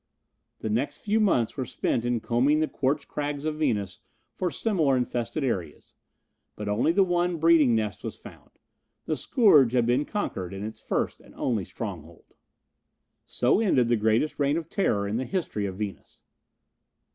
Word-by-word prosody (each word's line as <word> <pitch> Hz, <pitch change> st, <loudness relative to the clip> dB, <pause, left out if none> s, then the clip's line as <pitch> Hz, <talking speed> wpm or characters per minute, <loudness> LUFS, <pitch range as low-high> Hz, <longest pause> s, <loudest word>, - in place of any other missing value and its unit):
The 110 Hz, -, -2 dB
next 120 Hz, +7 st, -2 dB
few 215 Hz, +1 st, +1 dB
months 150 Hz, -, +2 dB
were 130 Hz, -, -2 dB
spent 120 Hz, -1 st, -1 dB
in 120 Hz, -2 st, 0 dB
combing 130 Hz, +7 st, +2 dB
the 155 Hz, -, +1 dB
quartz 140 Hz, +1 st, -1 dB
crags 145 Hz, 0 st, -4 dB
of 155 Hz, -1 st, -2 dB
Venus 105 Hz, -, -1 dB, 0.3 s
for 180 Hz, -, -1 dB
similar 160 Hz, -, +1 dB
infested 125 Hz, +3 st, -2 dB
areas, 90 Hz, -, -4 dB, 0.6 s
but 105 Hz, -, -6 dB
only 105 Hz, +9 st, +2 dB
the 195 Hz, +3 st, +4 dB
one 175 Hz, -1 st, 0 dB
breeding 160 Hz, -6 st, +5 dB
nest 105 Hz, -4 st, -2 dB
was -, -, -5 dB
found. -, -, -14 dB, 0.6 s
The 155 Hz, -, -1 dB
scourge 150 Hz, -, +4 dB
had 120 Hz, -2 st, +3 dB
been 125 Hz, +5 st, +2 dB
conquered 95 Hz, -, -4 dB
in 95 Hz, -, -6 dB
its 110 Hz, +1 st, -6 dB
first -, -, -2 dB
and -, -, -18 dB
only 110 Hz, -7 st, -1 dB
stronghold. -, -, -8 dB, 0.9 s
So 125 Hz, +10 st, +2 dB
ended 130 Hz, -, +2 dB
the 120 Hz, -, +4 dB
greatest 110 Hz, +8 st, +1 dB
reign 145 Hz, +2 st, +2 dB
of 165 Hz, -1 st, -5 dB
terror 100 Hz, -, 0 dB
in 105 Hz, +3 st, -1 dB
the 130 Hz, -, -1 dB
history 140 Hz, -, -2 dB
of 95 Hz, -1 st, -6 dB
Venus. 105 Hz, -2 st, -7 dB
130 Hz, 170 wpm, -26 LUFS, 110-155 Hz, 0.9 s, breeding